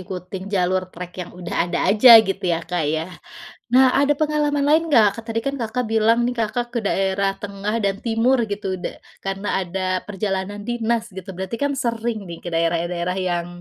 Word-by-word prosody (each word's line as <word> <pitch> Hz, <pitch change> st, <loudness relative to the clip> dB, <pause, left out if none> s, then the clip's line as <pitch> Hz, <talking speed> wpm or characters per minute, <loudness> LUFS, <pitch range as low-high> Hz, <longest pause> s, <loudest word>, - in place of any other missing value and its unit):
ikutin 185 Hz, +1 st, -7 dB
jalur 185 Hz, -2 st, +1 dB
trek 180 Hz, 0 st, -9 dB
yang 175 Hz, -, -7 dB
udah 175 Hz, -1 st, -2 dB
ada -, -, -1 dB
aja 230 Hz, +2 st, +9 dB
gitu 195 Hz, -, -2 dB
ya, 165 Hz, -1 st, 0 dB
Kak, 175 Hz, -1 st, -2 dB
ya. 160 Hz, +4 st, -2 dB, 0.6 s
Nah, 260 Hz, 0 st, +6 dB
ada 285 Hz, +1 st, +3 dB
pengalaman 295 Hz, -1 st, 0 dB
lain 315 Hz, +3 st, +3 dB
enggak? 220 Hz, -7 st, +4 dB
Kan -, -, -9 dB
tadi 225 Hz, 0 st, -1 dB
kan 275 Hz, 0 st, -2 dB
Kakak 240 Hz, +2 st, -2 dB
bilang 225 Hz, +2 st, +3 dB
nih 245 Hz, -, +1 dB
Kakak 240 Hz, +2 st, -2 dB
ke 240 Hz, -, -1 dB
daerah 195 Hz, -1 st, 0 dB
tengah 200 Hz, +1 st, -4 dB
dan 200 Hz, 0 st, 0 dB
timur 235 Hz, +3 st, +2 dB
gitu, 200 Hz, -2 st, -3 dB
da -, -, -5 dB, 0.2 s
karena 195 Hz, +1 st, -4 dB
ada 185 Hz, 0 st, -3 dB, 0.2 s
perjalanan 200 Hz, 0 st, -3 dB
dinas 235 Hz, 0 st, -1 dB
gitu, 185 Hz, -1 st, -9 dB
berarti 190 Hz, +5 st, -5 dB
kan 285 Hz, 0 st, 0 dB
sering 230 Hz, -3 st, -2 dB
nih 170 Hz, -3 st, -8 dB
ke -, -, -10 dB
daerah-daerah 170 Hz, +2 st, 0 dB
yang 175 Hz, -2 st, -1 dB
200 Hz, 185 wpm, -21 LUFS, 185-235 Hz, 0.6 s, aja